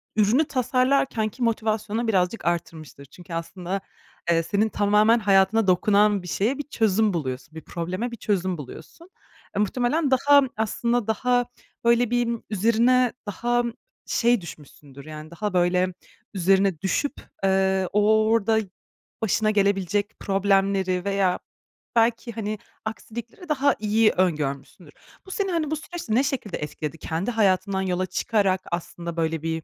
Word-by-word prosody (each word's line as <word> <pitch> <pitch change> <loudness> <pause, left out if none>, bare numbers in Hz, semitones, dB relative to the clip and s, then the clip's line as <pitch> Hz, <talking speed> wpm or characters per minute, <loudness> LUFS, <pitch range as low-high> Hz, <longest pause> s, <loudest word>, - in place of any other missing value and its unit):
ürünü 220 +8 +3
tasarlarken 255 -3 +1
ki 240 +3 -6
motivasyonu 220 0 -1
birazcık 190 0 0
arttırmıştır. 165 -4 -4
Çünkü 175 +5 -13
aslında, 180 +3 -4 0.5
eee, 165 0 +3
senin 210 +5 +1
tamamen 210 +3 +3
hayatına 200 +1 +3
dokunan 205 +2 +3
bir 180 - -8
şeye 225 +10 0
bir 290 - -3
çözüm 220 -6 +1
buluyorsun, 135 -2 -4
bir 160 - -7
probleme 180 +9 -4
bir 235 - -6
çözüm 190 -4 -1
buluyorsun. 160 - -11 0.5
E, 200 - 0
muhtemelen 250 +8 +1
daha 285 +2 +6 0.2
aslında 235 +1 0
daha 245 +3 +1 0.4
böyle 235 0 +3
bir 240 -1 +1 0.2
üzerine 230 +4 +3
daha, 240 +4 0 0.4
şey, 240 -2 +2
düşmüşsündür, 145 -4 -12
yani, 155 +1 -9
daha 210 +3 -3
böyle 180 +1 +2 0.4
üzerine 190 -2 +2
düşüp, 280 +9 0 0.3
eee, 190 -1 +2
o 215 +1 +4
orada 225 -1 +3 0.6
başına 215 0 +1
gelebilecek 200 0 0
problemleri 195 -2 +1
veya 195 -2 +1 0.6
belki, 230 +1 +2
hani, 215 -2 -4 0.3
aksilikleri 235 - -7
daha 285 -1 +2
iyi 215 +1 +3
öngörmüşsündür. 150 -7 -2 0.3
Bu 380 - -10
seni, 390 0 -1
hani, 315 -3 -1
bu - - +1
süreçte 310 -7 -4
ne 260 - +4
şekilde 265 -8 -3
etkiledi 150 +1 -5
kendi 165 +8 -3
hayatından 200 -3 +1
yola 185 -1 -1
çıkarak 190 0 0
aslında 170 0 -5
böyle 160 -1 -1
bir 160 0 -2
205 Hz, 135 wpm, -24 LUFS, 180-235 Hz, 0.6 s, daha